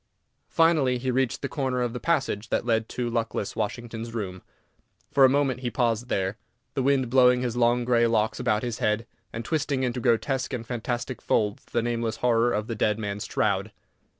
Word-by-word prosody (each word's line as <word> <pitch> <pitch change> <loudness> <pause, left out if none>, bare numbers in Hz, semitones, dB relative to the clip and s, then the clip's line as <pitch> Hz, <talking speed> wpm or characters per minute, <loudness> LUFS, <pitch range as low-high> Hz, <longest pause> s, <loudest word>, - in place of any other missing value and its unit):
Finally 155 -6 +3
he 130 +1 -1
reached 130 +1 0
the - - 0
corner 130 -3 -2
of 120 -1 -2
the 125 - -4
passage 135 -10 0
that - - 0
led 115 -2 +1
to 125 -1 -3
luckless 115 -3 -2
Washington's 115 +1 -4
room. 95 -4 -4 0.7
For 140 - +5
a - - +6
moment 135 -2 +1
he 125 -1 -2
paused 120 -1 0
there, 95 +2 -1 0.3
the 135 - -1
wind 135 -1 +2
blowing 125 0 +5
his 120 -2 -2
long 120 0 +2
grey 120 -1 +3
locks 110 -1 +1
about 110 -3 +1
his 120 -2 -3
head, 105 +2 0 0.3
and 115 0 -6
twisting 140 -3 0
into 125 0 -1
grotesque 130 +3 0
and 120 -2 -4
fantastic 120 +2 -3
folds 105 -1 0
the 120 - -1
nameless 115 -1 -1
horror 120 0 +2
of 105 -1 -1
the 115 - -4
dead 105 -1 +1
man's 105 -1 -4
shroud. 100 0 0
120 Hz, 190 wpm, -26 LUFS, 110-125 Hz, 0.7 s, a